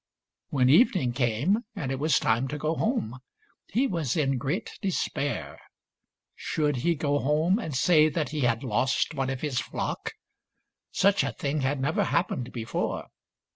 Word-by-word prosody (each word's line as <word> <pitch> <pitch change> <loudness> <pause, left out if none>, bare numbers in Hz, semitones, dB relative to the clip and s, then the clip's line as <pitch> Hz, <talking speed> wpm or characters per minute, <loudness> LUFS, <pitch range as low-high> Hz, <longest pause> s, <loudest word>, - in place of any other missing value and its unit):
When 130 -3 +2
evening 155 - +4
came 125 - +1 0.2
and 140 -10 -3
it 135 - -2
was 155 +2 +3
time 115 +4 +1
to 150 - -4
go 155 +2 -1
home, 160 - -1 0.5
he 245 +8 +1
was 165 - -1
in 135 -4 +1
great 150 - -3
despair. 175 -7 -2 0.7
Should 150 -3 -1
he 170 +7 +1
go 145 -1 0
home 155 - +2
and 160 - -4
say 155 +3 +5
that 155 -1 -2
he 150 - -4
had 120 -3 +1
lost 130 +6 0
one 135 -3 -1
of 135 -1 -4
his 145 -5 -1
flock? - - -4 0.8
Such 200 +1 +3
a - - -1
thing 145 +1 -2
had 135 +1 0
never 145 +5 +1
happened 130 -8 -1
before. 115 -1 -3
145 Hz, 160 wpm, -27 LUFS, 130-165 Hz, 0.8 s, say